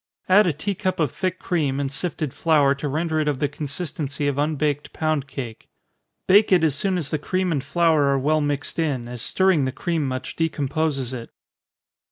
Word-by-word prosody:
Add 195 +2 +6
a - - +3
tea 195 +8 -2
cup 190 -2 -2
of 150 -6 +1
thick 185 -1 -2
cream, 150 -8 -1
and 140 -1 -2
sifted 150 -1 -3
flour 150 -4 +3
to 140 +1 -4
render 160 +2 0
it 155 - 0
of 145 -3 +1
the 145 - +1
consistency 145 -1 -3
of 140 0 -1
unbaked 150 -1 -1
pound 155 -3 -1
cake. 125 -4 -7 0.6
Bake 205 +3 +5
it 180 -3 +5
as 155 -3 +3
soon 185 +6 0
as 150 -5 -3
the 155 - 0
cream 185 +3 -1
and 140 -5 -1
flour 160 0 +3
are 140 0 +2
well 155 +3 +2
mixed 145 +2 -2
in, 135 -7 -1
as 120 -1 -5
stirring 185 -1 +2
the 130 - -1
cream 160 +1 -1
much 130 0 -4
decomposes 150 -4 -1
it. 115 -2 -6
150 Hz, 200 wpm, -23 LUFS, 140-165 Hz, 0.6 s, Add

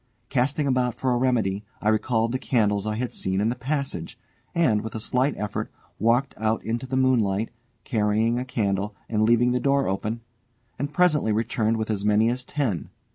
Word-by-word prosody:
Casting 145 +4 +1
about 125 -3 +1
for 130 - 0
a - - +2
remedy, 115 -6 +1 0.2
I 105 - +1
recalled 110 +1 +1
the 130 - -1
candles 105 -5 +1
I 105 - -1
had 125 +2 -3
seen 95 0 -1
in 105 +2 +2
the 120 - -1
passage, 130 - -3 0.4
and, 130 -11 +3
with 110 +1 -7
a - - -2
slight 125 +6 +1
effort, 105 -1 -3 0.3
walked 120 +5 +2
out 110 0 0
into 115 +3 -2
the 130 +1 -1
moonlight, 115 -5 +2 0.3
carrying 110 +1 +1
a - - -2
candle 105 -5 -1
and 110 -2 0
leaving 120 +2 +4
the 125 - +1
door 140 +1 +2
open, 105 +4 -2 0.6
and 145 +2 -2
presently 150 -8 +3
returned 115 0 +1
with 110 0 -2
as 100 -2 -2
many 105 +2 +3
as 125 +1 -3
ten. 125 - -2
115 Hz, 185 wpm, -25 LUFS, 105-130 Hz, 0.6 s, leaving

